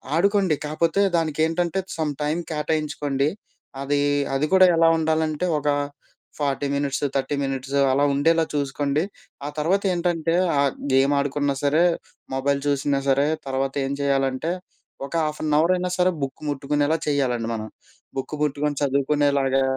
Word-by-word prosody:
ఆడుకోండి, 195 -2 +3
కాకపోతే 165 +5 +1 0.2
దానికి 155 -2 -2
ఏంటంటే 170 +3 -1 0.2
సమ్‌టైమ్ 150 +1 -1
కేటాయించుకోండి, 150 -2 -1 0.5
అది, 145 +1 0 0.3
అది 135 +3 +1
కూడా 185 0 +8
ఎలా 165 0 +5
ఉండాలంటే 160 0 0
ఒక 150 - -5 0.7
40 140 -1 -1
మినిట్స్, 140 0 -1
30 135 +1 0
మినిట్స్ 135 0 -3 0.2
అలా 140 +2 +2
ఉండేలా 165 +4 +3
చూసుకోండి. 145 +2 0 0.4
ఆ - - -2
తర్వాత 185 +6 +2
ఏంటంటే, 170 -2 0 0.3
ఆ - - +4 0.3
గేమ్ 135 +2 +4
ఆడుకున్నా 140 0 0
సరే 150 +4 +3 0.5
మొబైల్ 140 +1 0
చూసినా 140 0 +1
సరే 140 +2 +3 0.2
తర్వాత 135 0 -1
ఏం 135 - -2
చేయాలంటే 135 +2 0 0.5
ఒక 140 - -10
హాఫ్ 150 0 -4
ఎన్ 150 -1 +1
అవర్ 170 +3 +3
అయినా 180 0 -2
సరే 180 0 +3
బుక్ 135 -1 -5
ముట్టుకునేలా 145 +2 0
చేయాలండి. 125 -5 0
మనం 110 0 -5 0.5
బుక్ 135 +3 -3
ముట్టుకొని 145 0 -1
చదువుకునేలాగా 140 -1 +2
145 Hz, 135 wpm, -23 LUFS, 140-160 Hz, 0.7 s, కూడా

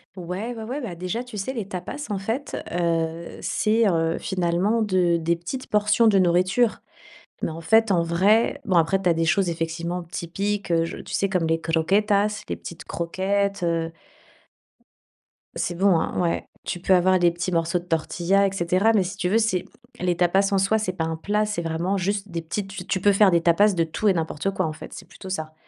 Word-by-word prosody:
Ouais, 185 +7 -5
ouais, 225 - -7
ouais, 250 +6 -4
bah, 220 -11 -6
déjà, 185 +8 -4
tu 245 -4 -9
sais, 195 +7 -3
les 225 -7 -5
tapas, 200 +10 -6
en 205 - -1
fait, 225 +8 -3 0.2
heu, 165 -1 -1
c'est, 225 +2 +1
heu, 165 -1 +1
finalement 185 +5 0
de 180 -4 +2
des 170 +1 0
petites 215 +10 -6
portions 210 +2 +3
de 205 -3 +4
nourriture. 185 +6 +2 0.6
Mais, - - -1
en 160 +1 -7
fait, 225 +5 +3
en 170 -3 +3
vrai, 195 +7 +2
bon, 185 - +1
après, 190 +4 +3
tu 180 - +3
as - - +5
des 165 0 0
choses 185 +2 +2
effectivement 170 +2 -3
typiques, 195 +3 -3
je - - -5
tu - - -10
sais, 195 - +1
comme 180 -4 0
les 165 0 +1
croquetas, 200 +6 +1
les - - -2
petites 170 - -10
croquettes, 195 +3 -1
heu. 165 -1 -1 1.6
C'est 175 - -2
bon, 185 -2 +3
hein? - - -3
Ouais. 175 -2 -1 0.2
Tu 175 - -3
peux 190 +2 +2
avoir 185 +1 +3
les 175 -1 +5
petits 175 +2 -3
morceaux 165 0 +1
de 175 - -13
tortilla, 175 +4 +1
et - - -3
cetera. 185 +3 +2
Mais, 200 - +3
si 185 +3 -5
tu 180 -3 -1
veux, 215 - +3
c'est 200 -5 +1 0.3
les 175 -1 0
tapas, 190 +3 +2
en - - +3
soi, 195 +3 +2
c'est 210 -4 -1
pas 165 - -2
un 160 0 -2
plat, 210 +6 0
c'est 210 -5 -3
vraiment 165 +4 -1
juste 200 +2 -2
des 170 -1 -4
petites 195 +5 -4
tu 195 - -7
tu 190 - -1
peux 205 - +4
faire 195 0 +5
des 170 - +3
tapas 185 +5 +4
de 170 -2 +1
tout 165 +6 -2
et 200 - +5
n'importe 165 +1 -2
quoi. 185 -3 -1
En 155 - -3
fait, - - -11
c'est 190 - -10
plutôt 190 +1 -11
ça. 155 -4 -4
185 Hz, 215 wpm, -24 LUFS, 170-205 Hz, 1.6 s, as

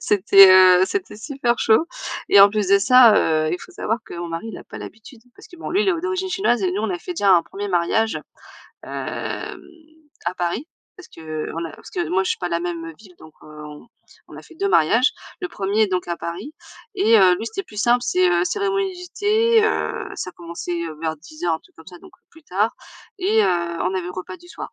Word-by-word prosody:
C'était, 195 -1 +6
heu, 185 -1 +7
c'était 380 - -4
super 240 0 -2
chaud. 225 +9 +3 0.4
Et - - +6
en 200 - +9
plus 210 -2 -1
de 200 0 +5
ça, 240 +1 +6
heu, 155 -1 +1
il 180 - -2
faut 370 - -13
savoir 225 -9 -2
que - - -10
mon 170 0 -5
mari 165 +7 -5
il - - -8
a - - -13
pas - - -10
l'habitude. 225 +2 -12
Parce - - -16
que 355 - -14
bon, 330 - -7
lui, 390 +4 +2
il 405 - 0
est - - +4
o 335 - -3
d'origine 370 +1 -2
chinoise 365 - +1
et 185 - +1
nous, 200 +3 -2
on 220 - -1
a 180 - -3
fait 360 - -6
déjà 200 - +3
un 170 - +3
premier 205 +4 -7
mariage, 195 +5 0 0.6
hem, 410 -3 -5 0.7
à 175 +2 -2
Paris, 180 - -3 0.3
parce 365 - -14
qu'on 160 +1 -6
a 165 - -7
parce - - -14
que 350 -2 -3
moi 190 +1 +1
je - - -2
suis - - -1
pas 175 - -3
la 170 -1 -1
même 170 -1 -4
heu, 165 - -9
ville, 195 -4 -17
donc 155 - -15
heu, - - -15 0.2
on 150 +9 -12 0.4
on - - -12
a - - -10
fait 335 - -17
2 395 +5 -1
mariages. 230 - +3 0.3
Le 365 - -4
premier 205 - 0
donc 180 -1 -2
à 170 - -2
Paris 185 - -7 0.4
et 230 - +4
heu, 185 -2 +6
lui 220 - -6
c'était 390 +11 -4
plus 210 - -15
simple, 240 +2 +3
c'est 185 -6 +2
heu, 175 0 +2
cérémonie 390 - -1
du 360 0 -10
thé, 440 +2 +3
heu, 435 - -2
ça 185 - -5
a - - -27
commencé 170 0 -6
heu 160 -2 -7
vers 160 -1 -2
10:00, 160 +2 -4
un - - -5
truc - - -25
comme 160 - -16
ça, 180 -2 -12
donc - - -17 0.2
plus 320 - -19
tard, 205 +2 -1 0.4
et 420 +4 +2
heu, - - +2 0.4
on 185 +1 -1
avait 180 -2 -3
repas 185 - -7
du 350 0 -18
soir. - - -9
200 Hz, 245 wpm, -21 LUFS, -, 0.7 s, en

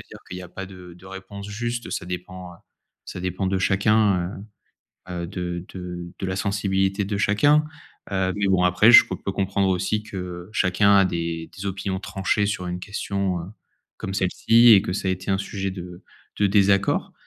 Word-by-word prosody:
dire - - -11
qu'il 90 - -5
y 90 - -8
a 90 - -10
pas 95 +2 -7
de 90 -2 -12
de 90 +2 -16
réponse 95 +1 -9
juste. 120 +3 -4
Ça 90 - -4
dépend 90 0 -7 0.5
ça - - -7
dépend 95 +1 -2
de 95 0 0
chacun, 95 -2 +2 0.7
heu - - -6
heu, - - -4
de 90 -2 -4
de 90 -1 -7
de 95 - -3
la 95 - -2
sensibilité 95 0 0
de 100 +1 -3
chacun. 145 +10 +3 0.5
Heu, 95 -1 0
mais 100 -1 0
bon 95 -2 +3
après 90 +6 +5
je 120 - +9
peux - - -4
peux 100 - -4
comprendre 95 0 0
aussi 95 +3 0
que 90 -3 -7
chacun 100 +1 +3
a 100 - +6
des 85 -2 -3
des 95 - -7
opinions 95 0 -3
tranchées 100 +2 0
sur 90 -3 -3
une 90 0 -4
question, 100 -2 -2
heu, - - -7 0.5
comme 95 - -5
celle-ci 115 +5 +4
et 100 -3 +7
que - - -3
ça 95 - -3
a - - +2
été 95 +2 -4
un 95 - +2
sujet 100 -1 -3
de 90 -1 -9 0.4
de 100 - +4
désaccord. 100 0 +2
95 Hz, 195 wpm, -23 LUFS, 90-100 Hz, 0.7 s, je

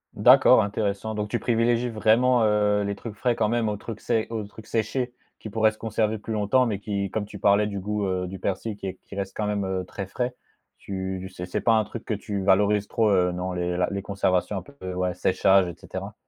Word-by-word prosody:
D'accord, - - +7
intéressant, 105 +1 -2
donc 105 -1 -3
tu - - 0
privilégies 120 +1 +1
vraiment, 115 +2 +3
heu, 105 -1 +2
les 100 0 -2
trucs 110 +2 -8
frais 120 +2 +1
quand 110 -2 +1
même 115 -1 +1
aux 105 - -2
trucs 110 +1 -7
sé 110 -1 0
aux 110 -2 -2
trucs 105 +1 -13
séchés 120 +3 -1 0.3
qui 110 - -7
pourraient 110 0 +3
se 110 - -17
conserver 110 -1 -1
plus 110 +2 -6
longtemps 110 +5 +3
mais 105 -5 -2
qui 100 -2 -3
comme 110 -2 -2
tu 105 0 -10
parlais 100 +1 +3
du 100 -1 -4
goût, 105 +1 -2
heu, 90 -1 -1
du 95 +1 -7
persil 100 +3 -2
qui 95 -2 -5
qui - - -11
reste 100 -1 -4
quand 105 - -1
même, 105 -1 -1
heu, 95 -1 -2
très 95 +1 -6
frais. 125 +5 -2 0.4
Tu 95 -1 -5
c'est 90 - -5
c'est 90 - -3
pas 115 - +4
un 110 -1 +4
truc 115 +2 -8
que - - -2
tu 100 -1 -4
valorises 100 +1 +3
trop, 110 -2 +2
heu, 90 -2 +3
non? 90 +1 -3
Les 90 0 -2
la 90 - +2
les 100 0 -2
conservations 95 0 0
un - - -3
peu 135 -10 -8
ouais, 90 0 -1
séchage 95 +1 +3
et 85 - -6
cetera. - - -7
105 Hz, 235 wpm, -25 LUFS, 95-110 Hz, 0.4 s, D'accord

